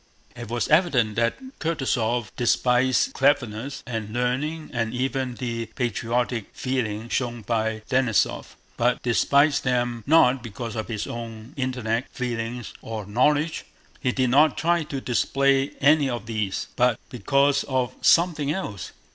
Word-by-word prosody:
It 120 Hz, -2 st, -8 dB
was 120 Hz, 0 st, -1 dB
evident 140 Hz, -, +3 dB
that 115 Hz, 0 st, +1 dB, 0.2 s
Kutúzov 120 Hz, -, -1 dB
despised 125 Hz, +1 st, +2 dB
cleverness 135 Hz, -2 st, 0 dB
and 110 Hz, -4 st, -4 dB
learning 130 Hz, +7 st, -2 dB
and 115 Hz, -1 st, -1 dB
even 130 Hz, 0 st, -2 dB
the 115 Hz, -2 st, -4 dB
patriotic 120 Hz, -1 st, -1 dB
feeling 115 Hz, -4 st, -2 dB
shown 120 Hz, -2 st, -2 dB
by 110 Hz, 0 st, -1 dB
Denísov, 125 Hz, -9 st, +1 dB, 0.2 s
but 120 Hz, +1 st, +1 dB
despised 140 Hz, +5 st, +3 dB
them 120 Hz, -2 st, 0 dB
not 135 Hz, -4 st, +5 dB
because 115 Hz, 0 st, -6 dB
of 110 Hz, -, -3 dB
his 110 Hz, -3 st, -3 dB
own 115 Hz, +1 st, -7 dB
intellect, 125 Hz, -3 st, -2 dB
feelings, 120 Hz, -1 st, -4 dB
or 110 Hz, -2 st, -5 dB
knowledge—he 145 Hz, +3 st, -1 dB
did 125 Hz, -1 st, +1 dB
not 145 Hz, +2 st, +5 dB
try 170 Hz, +1 st, +2 dB
to 140 Hz, -3 st, -5 dB
display 135 Hz, +2 st, +2 dB
any 145 Hz, 0 st, +4 dB
of 120 Hz, -4 st, -4 dB
these—but 110 Hz, +2 st, -1 dB
because 140 Hz, +2 st, +2 dB
of 130 Hz, -3 st, -1 dB
something 165 Hz, -4 st, +3 dB
else. 110 Hz, -, -5 dB
125 Hz, 130 wpm, -24 LUFS, 115-140 Hz, 0.2 s, not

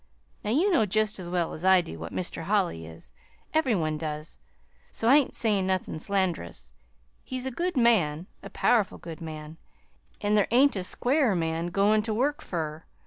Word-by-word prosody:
Now, 210 Hz, -, -3 dB
you 330 Hz, -, +3 dB
know 220 Hz, -, +3 dB
jest 215 Hz, +1 st, 0 dB
as 175 Hz, -2 st, -6 dB
well 175 Hz, -2 st, -1 dB
as 155 Hz, -, -8 dB
I 190 Hz, 0 st, +6 dB
do 80 Hz, -, -9 dB
what 80 Hz, 0 st, -7 dB
Mr. 170 Hz, -2 st, -4 dB
Holly 180 Hz, -, 0 dB
is 80 Hz, 0 st, -13 dB, 0.4 s
every 300 Hz, -8 st, +2 dB
one 155 Hz, -3 st, -1 dB
does, 155 Hz, 0 st, -5 dB, 0.5 s
so 225 Hz, -, -3 dB
I 270 Hz, +4 st, +8 dB
ain't 285 Hz, -, +1 dB
sayin' 205 Hz, -4 st, +1 dB
nothin' 185 Hz, -4 st, -1 dB
sland'rous. 170 Hz, -, -2 dB, 0.5 s
He's 255 Hz, 0 st, -4 dB
a 265 Hz, -, -2 dB
good 350 Hz, +4 st, -2 dB
man 180 Hz, -10 st, +3 dB, 0.2 s
a -, -, -9 dB
powerful 220 Hz, -5 st, +1 dB
good 165 Hz, -2 st, -9 dB
man; 155 Hz, -1 st, -8 dB, 0.6 s
an' 205 Hz, 0 st, 0 dB
there 210 Hz, -2 st, +3 dB
ain't 265 Hz, +3 st, +4 dB
a 190 Hz, -, -2 dB
squarer 250 Hz, +3 st, +1 dB
man 165 Hz, 0 st, -1 dB
goin' 200 Hz, +4 st, +3 dB
ter 220 Hz, 0 st, -2 dB
work 285 Hz, +7 st, 0 dB
fur. 160 Hz, -2 st, -4 dB
190 Hz, 185 wpm, -27 LUFS, 160-230 Hz, 0.6 s, I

